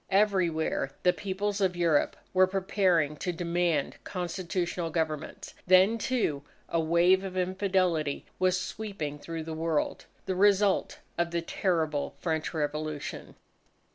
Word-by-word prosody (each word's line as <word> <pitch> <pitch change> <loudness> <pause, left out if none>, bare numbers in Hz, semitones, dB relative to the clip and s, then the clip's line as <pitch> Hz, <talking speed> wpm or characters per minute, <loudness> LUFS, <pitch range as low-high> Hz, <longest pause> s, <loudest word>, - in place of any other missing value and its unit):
Everywhere 185 -8 +2
the 180 - +5
Peoples 200 +1 -2
of 185 -2 +2
Europe 165 -4 +2 0.2
were 185 0 +5
preparing 185 -5 +1
to 180 - -2
demand 170 -3 0
constitutional 175 -1 -3
governments. 155 -2 -3
Then, 190 +5 +5
too, 215 - 0 0.3
a 165 - 0
wave 170 +4 +4
of 185 -1 -5
infidelity 185 -5 0
was 185 0 +2
sweeping 185 -7 -5
through 165 +1 -5
the 160 0 -6
world, 160 -1 -1 0.2
the 190 - -1
result 200 0 +3 0.2
of 170 0 +1
the 170 0 -2
terrible 160 -5 -1
French 160 -2 -2
Revolution. 150 -1 -4
175 Hz, 125 wpm, -29 LUFS, 160-190 Hz, 0.3 s, the